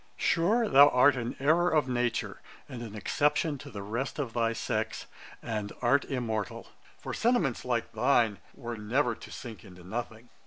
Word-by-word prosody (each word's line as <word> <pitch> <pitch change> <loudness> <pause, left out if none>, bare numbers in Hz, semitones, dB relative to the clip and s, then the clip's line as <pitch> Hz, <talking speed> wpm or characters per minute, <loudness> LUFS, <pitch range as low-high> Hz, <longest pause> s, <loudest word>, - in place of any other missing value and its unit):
Sure, 215 +8 +2
thou 145 -5 +8
art 130 +2 +5
an 120 -1 -4
errour 165 +6 +3
of 155 -5 +2
nature, 120 -2 -1 0.3
and 125 -2 -8
an 110 -3 -7
exception 145 +6 0
to - - -10
the 100 -1 -7
rest 115 +7 -3
of 135 -6 -3
thy 115 -1 +1
sex, 115 - -3 0.4
and 105 -2 -3
art 135 +4 +3
immortal; 115 -6 -3 0.3
for - - -6
sentiments 225 - +1
like 120 -2 -1
thine 115 -2 +2 0.2
were 120 0 -6
never 120 +4 0
to 115 - -12
sink 115 -4 -9
into 90 -4 -14
nothing. 115 +4 -6
120 Hz, 165 wpm, -29 LUFS, 110-145 Hz, 0.4 s, thou